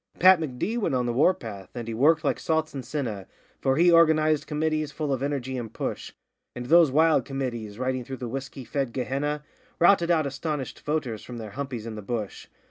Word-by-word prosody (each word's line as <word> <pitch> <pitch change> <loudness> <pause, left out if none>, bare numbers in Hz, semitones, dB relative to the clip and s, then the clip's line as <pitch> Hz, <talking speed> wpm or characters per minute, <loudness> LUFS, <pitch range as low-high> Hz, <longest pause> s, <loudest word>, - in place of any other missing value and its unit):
Pat 185 0 +7
M'D. 160 - -2
went 200 - 0
on 125 -1 +1
the 120 - -1
war 145 +9 +5
path, 100 - -8
and 120 -2 -5
he 115 - -3
worked 155 +7 +3
like 145 - 0
salts 160 -2 0
and 135 -2 -5
senna, 115 - -4 0.3
For 135 0 +1
he 175 +2 +5
organised 155 -2 +4
committees 155 0 -1
full 145 -1 -2
of 130 - -2
energy 135 -2 -2
and 115 -3 -6
push; - - -4 0.4
And 125 - -5
those 165 +3 +6
wild 160 +3 +4
committees 120 -7 -4
riding 130 0 -1
through 130 +2 -7
the 125 - -5
whisky 135 +1 -6
fed 130 +1 -2
Gehenna 145 +3 -2 0.3
Routed 175 -1 +4
out 160 -3 +3
astonished 140 0 -4
voters 130 -8 -2
from 120 +1 -8
their 110 -3 -7
humpies 130 -3 -5
in 115 - -5
the 105 - -6
bush. 105 -1 -5
135 Hz, 205 wpm, -26 LUFS, 120-155 Hz, 0.4 s, Pat